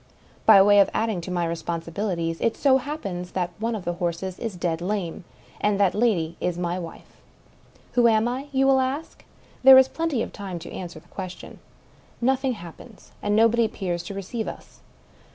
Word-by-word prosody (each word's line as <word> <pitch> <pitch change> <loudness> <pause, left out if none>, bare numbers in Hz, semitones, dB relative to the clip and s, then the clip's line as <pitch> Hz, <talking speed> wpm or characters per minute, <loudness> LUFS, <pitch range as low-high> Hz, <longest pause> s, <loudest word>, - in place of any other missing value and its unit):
By 215 -3 +9
way 205 0 +6
of 200 - +5
adding 220 -5 0
to 170 - -8
my 175 -1 0
responsibilities, 170 +1 -3
it 230 - 0
so 270 -2 +4
happens 200 - -5
that 180 -2 -1
one 230 +1 -1
of 200 - -6
the 175 - -1
horses 175 +2 -3
is 225 -5 -4
dead 170 -2 -2
lame, 185 -2 -3 0.3
and 205 -1 +1
that 195 -3 +4
the - - -4
lady 175 -8 +1
is 180 -1 -1
my 175 +1 -2
wife. 165 -2 -11 0.7
Who 240 -1 +4
am 220 0 +3
I? 260 +4 -3
— - - -28
you 270 -1 +2
will 270 0 +5
ask. 265 +5 -3 0.4
There 265 0 +10
is 260 0 +7
plenty 320 -6 -1
of - - -8
time 195 -4 -6
to 170 +1 -9
answer 175 -3 -7
the - - -24
question. 185 -2 -8 0.6
Nothing 265 +1 +1
happens; 195 +3 -12
and 205 0 0
nobody 230 +1 +4
appears 180 -5 -3
to 200 - -6
receive 215 +4 -4
us. - - -9
200 Hz, 190 wpm, -24 LUFS, 175-235 Hz, 0.7 s, There